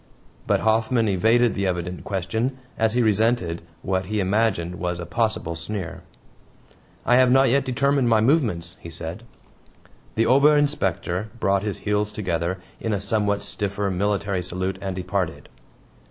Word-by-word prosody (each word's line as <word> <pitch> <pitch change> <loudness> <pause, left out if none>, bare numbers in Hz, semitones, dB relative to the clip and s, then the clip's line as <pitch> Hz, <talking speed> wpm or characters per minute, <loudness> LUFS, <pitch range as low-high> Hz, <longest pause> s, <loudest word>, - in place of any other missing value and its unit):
But - - +2
Hoffman 110 +1 +2
evaded 110 +4 +3
the 100 0 -1
evident 90 0 -3
question, 110 +7 -2 0.2
as 110 -1 +1
he 125 0 +2
resented 110 -5 +1 0.2
what 95 0 -1
he 105 +1 -1
imagined 95 -3 0
was 90 -1 -2
a 85 - -5
possible 90 -2 -1
sneer. 85 +2 -5 1.0
"I 120 - +5
have 130 -1 +5
not 135 0 +5
yet 135 +2 +2
determined 135 0 +2
my 110 -1 +4
movements," 110 - +1
he 85 - -9
said. 80 +4 -6 0.9
The 115 - +2
Ober 140 +5 +5
Inspector 105 - 0
brought 100 -1 +2
his 105 -1 -3
heels 105 0 +1
together 90 -3 -2 0.2
in 110 - -2
a 100 - 0
somewhat 100 0 0
stiffer 100 -1 -2
military 100 0 0
salute 95 +2 -3
and 95 -2 -3
departed. 95 -2 -3
100 Hz, 150 wpm, -23 LUFS, 90-115 Hz, 1.0 s, I